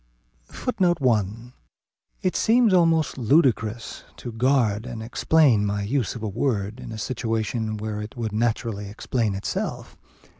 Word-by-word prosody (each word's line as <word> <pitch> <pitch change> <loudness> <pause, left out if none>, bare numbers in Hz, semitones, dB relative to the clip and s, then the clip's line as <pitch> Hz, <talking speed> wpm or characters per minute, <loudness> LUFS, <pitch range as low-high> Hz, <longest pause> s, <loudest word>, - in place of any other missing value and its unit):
[Footnote 190 -8 0
1: 115 -1 0 0.7
It 185 - 0
seems 230 -2 +4
almost 165 -5 +3
ludicrous 120 -4 +1
to 120 - -7
guard 115 -2 +1
and 115 -3 -6
explain 125 -1 +3
my 105 0 -1
use 125 +3 -1
of 115 - -7
a - - -1
word 105 0 -1
in - - -8
a 110 - -6
situation 110 -1 -2
where 105 0 -4
it 105 +5 -8
would 115 -2 -2
naturally 110 -2 -1
explain 110 0 -1
itself. 100 - -4
115 Hz, 140 wpm, -24 LUFS, 105-135 Hz, 0.7 s, seems